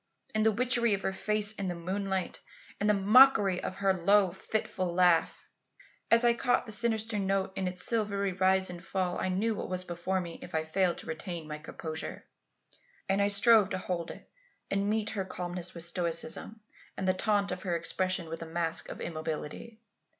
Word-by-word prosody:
And 215 0 +2
the 220 - +4
witchery 235 -1 +2
of 195 - -8
her 190 - -1
face 210 +1 0
in 200 -3 -4
the 175 - -2
moonlight; 190 +2 -2 0.4
and 205 - +1
the 210 - +4
mockery 205 -2 +5
of - - -4
her 195 -1 +2
low 190 +1 +3
fitful 190 -1 -3
laugh! 175 -2 +3 0.7
As 230 +1 +5
I 235 - +5
caught 245 +1 +1
the 220 - -7
sinister 220 -1 +1
note 195 -1 -1
in 190 - -1
its 180 0 -2
silvery 200 -4 0
rise 190 0 +2
and 175 0 -9
fall, 185 -2 -2
I - - -1
knew 210 +5 0
what 205 - -5
was 185 0 -2
before 180 +2 -2
me 170 -2 -7
if 175 - -8
I 160 - +1
failed 175 +2 0
to - - -8
retain 160 0 -5
my 150 0 -6
composure. 160 +1 -6 0.8
And 195 +1 +1
I 200 - +3
strove 205 0 +5
to 190 - -2
hold 175 -2 -3
it - - -10 0.4
and 195 - +1
to - - -1
meet 215 0 0
her 200 -3 -2
calmness 180 -1 -3
with 170 - -3
stoicism 175 +6 -2 0.4
and 190 - -2
the 185 - +4
taunt 200 +1 0
of 180 - -4
her 175 -3 -1
expression 180 +1 -1
with 165 +1 -6
a 165 - -6
mask 165 0 -2
of - - -8
immobility. 165 +7 -5
190 Hz, 195 wpm, -30 LUFS, 175-210 Hz, 0.8 s, mockery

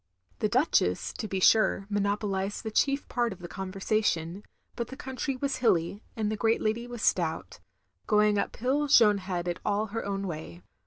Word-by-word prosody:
The 215 - +1
Duchess, 255 +9 +1
to 220 - -5
be 190 -1 -2
sure, 200 0 +4
monopolized 205 -1 -1
the 220 - -4
chief 275 +5 +1
part 240 -2 0
of 190 - -7
the 175 - -8
conversation, 190 -2 -1 0.3
but 235 - -3
the 265 - -9
country 265 +1 -3
was 275 +2 -2
hilly, 200 -5 +1
and 215 -1 -1
the - - -1
great 225 +1 +1
lady 225 +2 -1
was 240 -2 -7
stout; 160 - 0 0.5
going 210 -1 +3
up - - -2
hill 275 +5 0
Jeanne 215 -7 +6
had 180 -2 -4
it 175 - -2
all 205 +1 0
her 225 - -2
own 200 0 -3
way. 155 - -7
210 Hz, 180 wpm, -28 LUFS, 190-235 Hz, 0.5 s, Jeanne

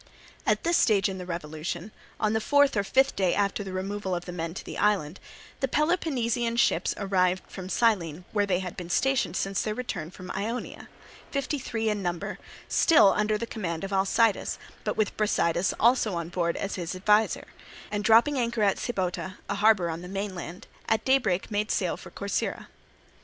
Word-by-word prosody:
At - - +2
this 340 0 +3
stage 200 -3 +3
in 190 -1 -5
the 180 - -7
revolution, 170 +3 -5 0.3
on 215 -1 +1
the 220 - +1
fourth 285 +2 +4
or 205 - +2
fifth 265 +6 +2
day 185 -3 +2
after 205 0 0
the 195 - -6
removal 190 0 -3
of 175 - -5
the 180 - -6
men 165 -1 -4
to - - -7
the - - -6
island, 195 -5 +1 0.4
the 270 - +1
Peloponnesian 255 -7 0
ships - - +2
arrived 185 -2 +1
from 185 -1 -8
Cyllene 180 -8 +1
where 205 -2 +1
they 185 -1 +1
had 180 -2 -6
been 175 -1 -7
stationed 270 +7 +1
since 195 -1 -1
their 215 -1 -2
return 175 -10 -4
from 185 0 -9
Ionia, 230 +5 -4 0.4
fifty 275 +1 -2
three 225 -3 -2
in 210 -2 0
number, 175 -2 -3 0.3
still 305 -11 +6
under 210 0 +1
the 230 - -3
command 180 -8 -4
of 195 0 -4
Alcidas, 200 +3 +2 0.3
but - - -2
with 215 - 0
Brasidas 180 -4 +1
also 230 -5 +3
on 170 -1 -3
board 170 -1 -1
as 200 - -3
his 175 0 -4
adviser; 210 +3 +2 0.5
and 205 0 -1
dropping 235 +6 +5
anchor 235 -2 0
at 200 -1 +3
Sybota, 190 -4 -3
a - - -1
harbour 200 -4 +3
on 165 +1 -5
the 180 - -8
mainland, 190 -2 -5 0.2
at 220 - +1
daybreak 225 -9 +2
made 210 +1 0
sail - - 0
for - - -11
Corcyra. - - -3
200 Hz, 185 wpm, -27 LUFS, 180-225 Hz, 0.5 s, still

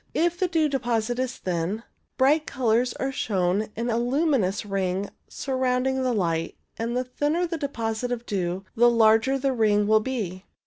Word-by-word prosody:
If 345 +1 +1
the 370 - +2
dew 325 -3 +2
deposit 245 -3 -1
is 255 -1 -2
thin, 180 +5 -2 0.3
bright 295 +4 +3
colours 245 0 +1
are 270 - -2
shown 195 -3 0
in 235 +2 -2
a 225 - +1
luminous 245 - +1
ring 195 0 -2 0.2
surrounding 260 0 -1
the 255 -1 +1
light, 165 -7 -1 0.2
and 230 +2 -2
the 255 - +1
thinner 295 +7 -1
the 335 -1 -4
deposit 235 -4 -2
of 240 -1 -3
dew 185 -1 -2
the 240 +1 +6
larger 225 +3 +4
the 270 0 0
ring 210 -3 +3
will 215 +1 +5
be. 210 -6 -4
235 Hz, 170 wpm, -25 LUFS, 210-265 Hz, 0.3 s, the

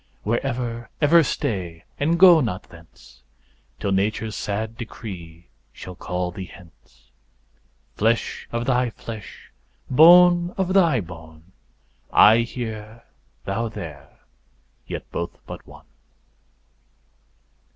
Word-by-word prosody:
Where 115 +3 0
ever, 120 -1 -4
ever 165 +3 +6
stay, 95 - -3 0.2
and 160 +4 +1
go 175 -3 +8
not 105 -8 -3
thence, 85 -1 -18 0.6
Till 100 - -2
nature's 105 +3 -1
sad 110 +2 -3
decree 90 -8 -9 0.3
shall 90 - -10
call 90 0 -4
thee 95 +1 -7
hence; 85 -4 -19 0.9
Flesh 115 +2 0
of 115 0 -2
thy 125 -1 +1
flesh, 110 -1 -10 0.4
bone 175 +4 +6
of 190 -1 0
thy 165 - +4
bone, 80 -1 -13 0.6
I 110 +2 +7
here, 115 -2 -5 0.4
thou 110 +4 -2
there, 80 -10 -10 0.7
yet - - -6
both 85 - -4
but - - -10
one. - - -15
110 Hz, 110 wpm, -23 LUFS, 90-125 Hz, 0.9 s, go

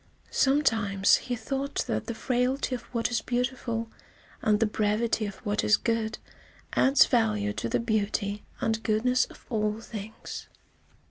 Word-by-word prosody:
Sometimes 225 -9 +3
he 250 - -3
thought 270 +5 -2
that - - -2
the 235 - -3
frailty 255 +3 0
of 250 - -2
what 235 0 0
is 235 -2 +1
beautiful 240 -2 -2 0.5
and 210 -1 +3
the 225 - +4
brevity 215 +1 0
of 200 - -6
what 205 0 0
is 210 - +5
good 225 -2 -1 0.6
adds 270 +1 +6
value 105 -2 +1
to 115 - -3
the - - +1
beauty 210 -2 -1 0.2
and 220 0 0
goodness 245 +4 +2
of - - -16
all 215 -1 0
things. 220 -1 -8
225 Hz, 145 wpm, -28 LUFS, 210-245 Hz, 0.6 s, adds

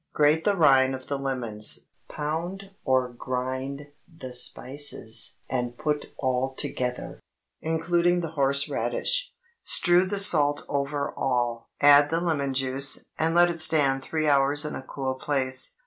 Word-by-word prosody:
Grate 150 +2 +2
the 205 -1 +2
rind 135 -4 +4
of 130 0 -10
the 140 - -3
lemons; 120 -6 +1 0.2
pound 175 +6 -5
or 130 -2 +1
grind 130 +3 -5 0.2
the 130 -6 -9
spices, 125 -1 -2
and 120 -1 -3
put 150 -1 -3
all 130 0 -2
together, 125 -1 -4 0.4
including 170 +2 0
the 165 -2 -5
horse 140 -2 +1
radish. - - -2 0.3
Strew 175 +1 +2
the 200 +2 -3
salt 145 -8 +3
over 140 0 -3
all, 120 -3 -2
add 145 0 +6
the 165 +2 0
lemon 145 -6 -1
juice, 135 +1 +2
and 160 +1 0
let 175 0 +5
it 170 -1 +1
stand 140 -4 +4
three 155 +2 -2
hours 145 +1 +3
in 150 - -4
a - - -6
cool 130 0 -4
place. 130 -1 -1
140 Hz, 145 wpm, -25 LUFS, 130-160 Hz, 0.4 s, add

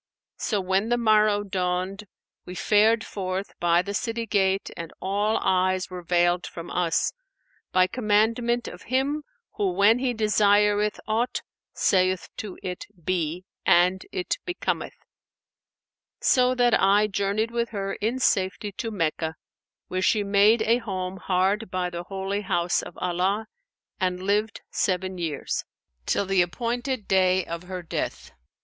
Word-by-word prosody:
So 210 - 0
when 190 +4 0
the 240 - +2
morrow 215 -2 +3
dawned, 185 +1 -2 0.4
we 180 - -8
fared 220 +4 +3
forth 190 0 -4
by 175 0 +3
the 200 - -5
city 230 +2 -2
gate 195 -2 +1
and 165 -1 -7
all 205 +3 0
eyes 185 0 +1
were 180 -1 -6
veiled 175 +1 +2
from 170 0 -8
us, 170 -2 +1 0.6
by 185 0 +5
commandment 230 +3 +1
of - - -9
Him 275 +4 +1 0.4
who 200 -3 +1
when 205 +5 +4
He 250 -2 0
desireth 210 -1 +3
aught, 225 +3 0 0.3
saith 185 -1 +2
to 205 -4 -6
it, 180 -1 -5 0.2
'Be,' 175 -1 -1 0.2
and 180 +2 +4
it 180 - -2
becometh;[FN#493] 355 0 -3 1.3
so 255 0 +4
that 245 -2 +3
I 200 +2 +5
journeyed 200 +2 -1
with 235 0 -1
her 195 -2 -3
in 225 +5 -1
safety 200 -4 +1
to 225 +4 -4
Meccah, 160 -5 -1 0.5
where 185 0 -2
she 210 +2 +3
made 205 +3 +4
a 230 +2 +3
home 190 -4 -4
hard 190 +5 0
by 180 -1 -2
the 175 0 -6
Holy 195 +1 -3
House 175 -3 0
of - - -10
Allah 185 +4 0 0.5
and 180 -1 0
lived 210 +3 0
seven 185 -1 -1
years; 160 -5 -2 0.4
till 200 - +1
the 195 -1 +3
appointed 235 +5 -2
day 185 -1 +3
of 170 +1 -6
her 180 -1 -6
death. 165 - -4
195 Hz, 145 wpm, -25 LUFS, 185-220 Hz, 1.3 s, by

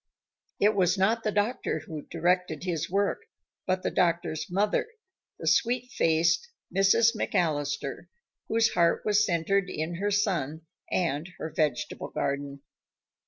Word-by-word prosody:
It 210 +2 +4
was 185 -1 +2
not 220 +5 +2
the 215 - 0
doctor 205 -6 -1
who 155 -2 -6
directed 175 -1 0
his 165 -4 -2
work, 200 - 0 0.5
but 185 0 0
the - - -1
doctor's 170 -2 0
mother 200 - +1 0.5
the - - -8
sweet 250 +1 +2
faced 165 - +2 0.3
Mrs. 195 +4 +4
McAllister, 145 -4 -1 0.4
whose 225 0 +3
heart 170 -1 +2
was 210 0 +4
centered 185 +1 +1
in 160 +1 -3
her 205 +3 0
son 175 -7 0 0.3
and 165 -1 0
her 160 - -6
vegetable 150 -6 -1
garden. 140 0 -3
180 Hz, 130 wpm, -28 LUFS, 160-205 Hz, 0.5 s, It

